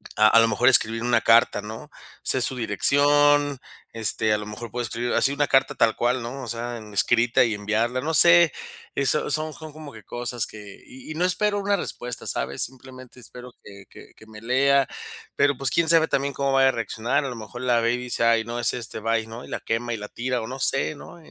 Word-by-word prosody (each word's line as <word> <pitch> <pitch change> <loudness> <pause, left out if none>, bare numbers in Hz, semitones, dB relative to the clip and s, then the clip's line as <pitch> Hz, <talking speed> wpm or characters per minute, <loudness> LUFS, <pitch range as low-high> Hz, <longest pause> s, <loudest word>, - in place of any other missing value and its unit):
a 110 - +5
a 115 - +6
lo 115 - +5
mejor 120 +3 +3
escribir 115 -2 +3
una 120 -1 +2
carta, 115 +2 +4
¿no? 110 +8 -9 0.3
Sé 130 - 0
su 125 +2 0
dirección, 145 +5 +3 0.4
este, 110 0 0
a - - +1
lo 105 - -7
mejor 105 +3 -8
puede 120 +2 -3
escribir 120 +2 -3
así 135 - +2
una 145 0 0
carta 135 - +2
tal 115 -1 +2
cual, 125 +1 0
¿no?, 125 +4 -7
o - - -7
sea, 120 +1 -5 0.2
escrita 120 +4 +3
y 115 -3 0
enviarla, 110 +5 -1
no 160 +4 -2
sé. 170 +1 +6 0.4
Eso 140 +2 0
son 155 +1 -2
son 155 -1 -10
como 155 -1 -10
que 110 -1 -13
cosas 120 0 -2
que 105 -2 -12
y 130 +4 -12
y - - -6
no 175 +3 +1
espero 205 +3 0
una 200 0 +1
respuesta, 125 -8 -6
¿sabes?, 70 - -2
simplemente 130 0 -10
espero 125 0 -12
que 100 -1 -13
que - - -15
que 110 - -18
me 110 -1 -12
lea. 135 +3 +2 0.5
Pero, 145 -2 +2
pues, 135 -1 -2
quién 165 -1 +2
sabe 165 -1 +5
también 140 -1 -1
cómo 140 -1 -1
vaya 135 0 +5
a - - +2
reaccionar, 115 +2 -2
a - - -3
lo 125 - -6
mejor 115 +2 -9
la 125 -2 +2
ve 115 +1 +1
y - - -1
dice: 125 -1 -3
"Ay, 115 -1 +3
no, 120 +1 -5
es - - +1
este, 120 -3 -6
bye", 115 0 -1
¿no?, 115 +2 -9
y - - -14
la - - -4
quema 120 +1 -2
y - - -3
la 105 0 -7
tira, 125 0 -3
o 110 - -6
no 130 +2 -7
sé, 135 +3 0
¿no? 145 - -12
125 Hz, 235 wpm, -24 LUFS, 115-140 Hz, 0.5 s, a